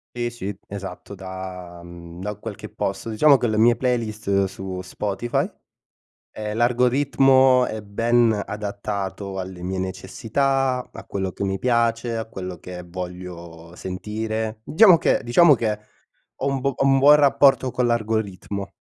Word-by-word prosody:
Sì, 120 Hz, 0 st, -1 dB
sì, 100 Hz, -4 st, -6 dB
esatto, 100 Hz, 0 st, -8 dB
da, 95 Hz, -2 st, -8 dB
mhmm, 85 Hz, 0 st, -11 dB
da 105 Hz, +2 st, -4 dB
qualche -, -, -8 dB
posto, 115 Hz, -, -4 dB
diciamo 140 Hz, +6 st, +5 dB
che 125 Hz, -, 0 dB
le 110 Hz, -2 st, 0 dB
mie 115 Hz, +2 st, +5 dB
playlist 110 Hz, -5 st, 0 dB
su 95 Hz, -1 st, -6 dB
Spotify. 105 Hz, +5 st, -2 dB, 0.7 s
Uhm, 105 Hz, +1 st, -6 dB
l'algoritmo 130 Hz, +1 st, +4 dB
è 110 Hz, -1 st, -5 dB
ben 115 Hz, +1 st, +2 dB
adattato 100 Hz, -1 st, -4 dB
alle 90 Hz, -1 st, -8 dB
mie 95 Hz, +1 st, -2 dB
necessità, 125 Hz, +7 st, -1 dB
a -, -, -10 dB
quello 95 Hz, -2 st, -3 dB
che -, -, -7 dB
mi 95 Hz, -1 st, -1 dB
piace, 115 Hz, 0 st, +1 dB
a 110 Hz, -, -3 dB
quello 90 Hz, -5 st, -7 dB
che 90 Hz, +1 st, -9 dB
voglio 85 Hz, -2 st, -8 dB
sentire. 110 Hz, +4 st, -4 dB
Diciamo 180 Hz, -, +6 dB
che -, -, +2 dB
diciamo 145 Hz, +6 st, +6 dB
che 110 Hz, -2 st, -1 dB, 0.6 s
ho -, -, -3 dB
un 135 Hz, -1 st, 0 dB
bu 140 Hz, 0 st, 0 dB
ho -, -, +1 dB
un 135 Hz, 0 st, +4 dB
buon 145 Hz, +2 st, +8 dB
rapporto 140 Hz, -2 st, +4 dB
con 125 Hz, -1 st, +1 dB
l'algoritmo. 105 Hz, -3 st, -2 dB
110 Hz, 145 wpm, -23 LUFS, 95-120 Hz, 0.7 s, buon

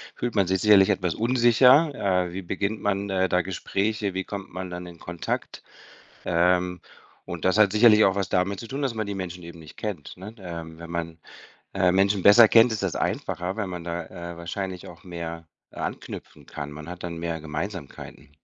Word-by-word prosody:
fühlt 120 Hz, -2 st, -3 dB
man 100 Hz, -2 st, +4 dB
sich 95 Hz, 0 st, 0 dB
sicherlich 105 Hz, -2 st, +6 dB
etwas 90 Hz, -4 st, 0 dB
unsicher. 125 Hz, +5 st, +5 dB, 0.3 s
„Äh, 85 Hz, -, -7 dB
wie 95 Hz, -, -4 dB
beginnt 100 Hz, +4 st, -2 dB
man, 100 Hz, 0 st, -1 dB
äh, 95 Hz, -1 st, +1 dB
da 90 Hz, +1 st, +3 dB
Gespräche? 100 Hz, +2 st, -2 dB
Wie 95 Hz, 0 st, -2 dB
kommt 100 Hz, -3 st, -7 dB
man 95 Hz, 0 st, -5 dB
dann 90 Hz, 0 st, -6 dB
in 85 Hz, -1 st, -12 dB
Kontakt?“ 85 Hz, -1 st, -5 dB, 0.6 s
Ähm, 90 Hz, +1 st, +2 dB, 0.4 s
und -, -, -7 dB
das 95 Hz, -, +3 dB
hat 100 Hz, -3 st, +5 dB
sicherlich 110 Hz, 0 st, +6 dB
auch 95 Hz, -, +3 dB
was 100 Hz, -2 st, -1 dB
damit 95 Hz, +1 st, 0 dB
zu 115 Hz, -, -9 dB
tun, 140 Hz, +2 st, -4 dB
dass 135 Hz, -4 st, 0 dB
man 110 Hz, -2 st, -2 dB
die 100 Hz, -, -4 dB
Menschen 90 Hz, -2 st, -6 dB
eben 85 Hz, 0 st, -10 dB
nicht 80 Hz, -, -13 dB
kennt, 100 Hz, -9 st, -5 dB
ne? 105 Hz, +4 st, -9 dB
Ähm, 85 Hz, -3 st, -8 dB
wenn 85 Hz, 0 st, -9 dB
man, 85 Hz, -1 st, -4 dB, 0.6 s
äh, 90 Hz, -, +3 dB
Menschen 95 Hz, +1 st, +2 dB
besser 110 Hz, +3 st, +9 dB
kennt, 115 Hz, +2 st, +6 dB
ist 110 Hz, -, -2 dB
das 95 Hz, -, -1 dB
einfacher, 90 Hz, +4 st, -2 dB
weil 105 Hz, -3 st, -2 dB
man 90 Hz, -2 st, -6 dB
da, 85 Hz, 0 st, -4 dB, 0.3 s
äh, 85 Hz, -, -10 dB
wahrscheinlich 90 Hz, +1 st, -5 dB
auch 85 Hz, +1 st, -13 dB
mehr 85 Hz, -2 st, -7 dB, 0.2 s
anknüpfen -, -, -7 dB
kann. 75 Hz, 0 st, -6 dB
Man 75 Hz, +3 st, -9 dB
hat 90 Hz, 0 st, -8 dB
dann 85 Hz, -1 st, -5 dB
mehr 85 Hz, -1 st, -3 dB
Gemeinsamkeiten. 75 Hz, -1 st, -7 dB
95 Hz, 200 wpm, -25 LUFS, 85-105 Hz, 0.6 s, besser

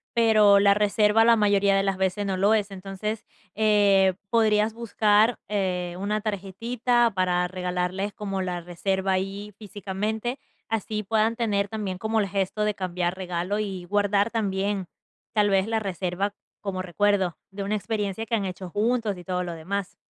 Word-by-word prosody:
Pero 215 Hz, -3 st, +6 dB
la 200 Hz, 0 st, +5 dB
reserva 210 Hz, +2 st, +3 dB
la 235 Hz, 0 st, +6 dB
mayoría 200 Hz, -2 st, +3 dB
de 195 Hz, -, +2 dB
las 195 Hz, -1 st, 0 dB
veces 190 Hz, +2 st, 0 dB
no 190 Hz, -1 st, -1 dB
lo 200 Hz, +3 st, +4 dB
es, 205 Hz, -2 st, 0 dB
entonces, 195 Hz, +3 st, -5 dB, 0.3 s
eh, 200 Hz, -3 st, +4 dB, 0.2 s
podrías 220 Hz, -1 st, +3 dB
buscar, 220 Hz, 0 st, +2 dB
eh, 180 Hz, -4 st, -1 dB
una 210 Hz, +1 st, -1 dB
tarjetita 230 Hz, +4 st, 0 dB
para 180 Hz, -1 st, +1 dB
regalarles 180 Hz, +2 st, -2 dB
como 195 Hz, -2 st, -3 dB
la 180 Hz, -1 st, -3 dB
reserva 190 Hz, +2 st, -1 dB
ahí 195 Hz, +2 st, -3 dB
físicamente. 210 Hz, +4 st, -4 dB, 0.3 s
Así 215 Hz, -1 st, -2 dB
puedan 220 Hz, +2 st, +1 dB
tener 205 Hz, -4 st, 0 dB
también 205 Hz, -3 st, -4 dB
como 220 Hz, +3 st, 0 dB
el 200 Hz, -, -1 dB
gesto 195 Hz, +2 st, -1 dB
de 210 Hz, 0 st, +1 dB
cambiar 180 Hz, -1 st, -2 dB
regalo 180 Hz, +2 st, -2 dB
y 190 Hz, -4 st, -4 dB
guardar 205 Hz, +2 st, +1 dB
también 200 Hz, -3 st, -1 dB, 0.5 s
tal 210 Hz, -2 st, +3 dB
vez 195 Hz, 0 st, +2 dB
la 225 Hz, 0 st, 0 dB
reserva 195 Hz, 0 st, -2 dB, 0.3 s
como 190 Hz, -2 st, -3 dB
recuerdo 190 Hz, -1 st, +1 dB
de 200 Hz, +1 st, -5 dB
una 205 Hz, +2 st, -1 dB
experiencia 210 Hz, 0 st, -3 dB
que 230 Hz, -, 0 dB
han 205 Hz, -3 st, -1 dB
hecho 185 Hz, 0 st, -6 dB
juntos 215 Hz, +1 st, 0 dB
y 180 Hz, -, -10 dB
todo 180 Hz, -1 st, -1 dB
lo 175 Hz, -, -4 dB
demás. 190 Hz, +4 st, -4 dB
200 Hz, 165 wpm, -25 LUFS, 190-215 Hz, 0.5 s, Pero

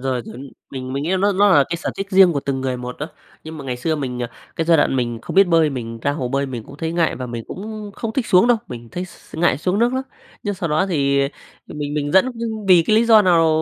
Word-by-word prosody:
rồi, 130 Hz, -2 st, -2 dB
chuẩn, 135 Hz, +2 st, -9 dB, 0.2 s
mình 130 Hz, -1 st, -6 dB
mình 140 Hz, +1 st, -2 dB
nghĩ 170 Hz, -, -2 dB
nó 200 Hz, +2 st, +2 dB
nó 205 Hz, +2 st, +4 dB
là 145 Hz, -7 st, +5 dB
cái 170 Hz, -, -2 dB
sở -, -, -3 dB
thích 195 Hz, -, -3 dB
riêng 190 Hz, -2 st, +6 dB
của 140 Hz, -, -1 dB
từng 135 Hz, -1 st, -2 dB
người 130 Hz, -1 st, -2 dB
một 125 Hz, 0 st, -6 dB
á. 150 Hz, -, -3 dB, 0.4 s
Nhưng 160 Hz, 0 st, -8 dB
mà 140 Hz, -, -8 dB
ngày 125 Hz, -2 st, -3 dB
xưa 155 Hz, +5 st, -1 dB
mình, 125 Hz, -3 st, -4 dB
à 120 Hz, -, -4 dB, 0.3 s
cái 165 Hz, -, 0 dB
giai 165 Hz, -1 st, +5 dB
đoạn 135 Hz, -, +2 dB
mình 120 Hz, -2 st, -1 dB
không -, -, -7 dB
biết 195 Hz, -1 st, +7 dB
bơi, 165 Hz, -3 st, +4 dB
mình 115 Hz, -3 st, -5 dB
ra 140 Hz, -, +1 dB
hồ 130 Hz, -5 st, -3 dB
bơi 140 Hz, +1 st, -1 dB
mình 120 Hz, -4 st, -6 dB
cũng 140 Hz, -, -12 dB
thấy 160 Hz, +2 st, -3 dB
ngại 170 Hz, -1 st, +1 dB
và 125 Hz, -, -5 dB
mình 120 Hz, -1 st, -6 dB
cũng 210 Hz, +1 st, -7 dB
không 225 Hz, -1 st, -4 dB
thích 250 Hz, -2 st, -1 dB
xuống 185 Hz, +6 st, +5 dB
đâu, 245 Hz, -1 st, +4 dB
mình 120 Hz, -1 st, -8 dB
thấy 180 Hz, +1 st, -3 dB
x 185 Hz, -, -16 dB
ngại 165 Hz, -5 st, +2 dB
xuống 185 Hz, +6 st, 0 dB
nước 240 Hz, +2 st, +2 dB
lắm. 260 Hz, -, -1 dB, 0.4 s
Nhưng 205 Hz, -1 st, -2 dB
sau 175 Hz, -2 st, -3 dB
đó 155 Hz, +6 st, +1 dB
thì, 140 Hz, -6 st, +1 dB, 0.5 s
ờ, -, -, -10 dB
mình 145 Hz, -1 st, -4 dB
mình 145 Hz, 0 st, -2 dB
dẫn 190 Hz, +7 st, +4 dB
v 230 Hz, -, -11 dB, 0.3 s
vì 175 Hz, -2 st, +7 dB
cái 215 Hz, -, +4 dB
lý 230 Hz, -, +4 dB
do 220 Hz, -2 st, +6 dB
nào? 170 Hz, -4 st, +4 dB
155 Hz, 290 wpm, -20 LUFS, 130-190 Hz, 0.5 s, biết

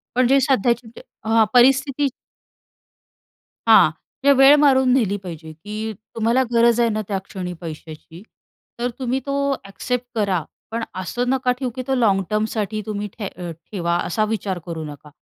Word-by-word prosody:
पण 250 Hz, -1 st, +4 dB
जे 275 Hz, +1 st, +5 dB
सध्याची 245 Hz, -2 st, +1 dB
जी 225 Hz, -, -13 dB, 0.2 s
हां, 225 Hz, 0 st, +4 dB
परिस्थिती 265 Hz, +3 st, +4 dB, 1.6 s
हां. -, -, +7 dB, 0.3 s
म्हणजे 280 Hz, -, +6 dB
वेळ 270 Hz, +2 st, +8 dB
मारून 265 Hz, -3 st, +4 dB
नेली 210 Hz, -6 st, +1 dB
पाहिजे, 165 Hz, -4 st, -9 dB
की 210 Hz, +6 st, -6 dB, 0.2 s
तुम्हाला 230 Hz, +3 st, +2 dB
गरज 235 Hz, 0 st, +4 dB
आहे 235 Hz, -, +3 dB
ना, 215 Hz, 0 st, -1 dB
त्या 200 Hz, -2 st, -1 dB
क्षणी 180 Hz, -3 st, -6 dB
पैशाची, 160 Hz, +1 st, -9 dB, 0.6 s
तर 245 Hz, +1 st, 0 dB
तुम्ही 255 Hz, +1 st, -1 dB
तो 280 Hz, 0 st, -2 dB, 0.3 s
ॲक्सेप्ट 250 Hz, +5 st, -3 dB
करा. 195 Hz, -6 st, 0 dB, 0.3 s
पण 230 Hz, +1 st, -2 dB
असं 240 Hz, +7 st, -2 dB
नका 260 Hz, -1 st, +1 dB
ठेऊ, 255 Hz, -, -1 dB
की 255 Hz, -, -3 dB
तो 270 Hz, -, +1 dB
लाँग 205 Hz, -6 st, +3 dB
टर्मसाठी 215 Hz, 0 st, -1 dB
तुम्ही 210 Hz, -1 st, -3 dB
ठे 200 Hz, -4 st, -4 dB, 0.4 s
ठेवा 170 Hz, -4 st, -1 dB
असा 215 Hz, +5 st, 0 dB
विचार 205 Hz, -4 st, -3 dB
करू 165 Hz, -2 st, -5 dB
नका. 150 Hz, 0 st, -10 dB
220 Hz, 160 wpm, -21 LUFS, 195-250 Hz, 1.6 s, वेळ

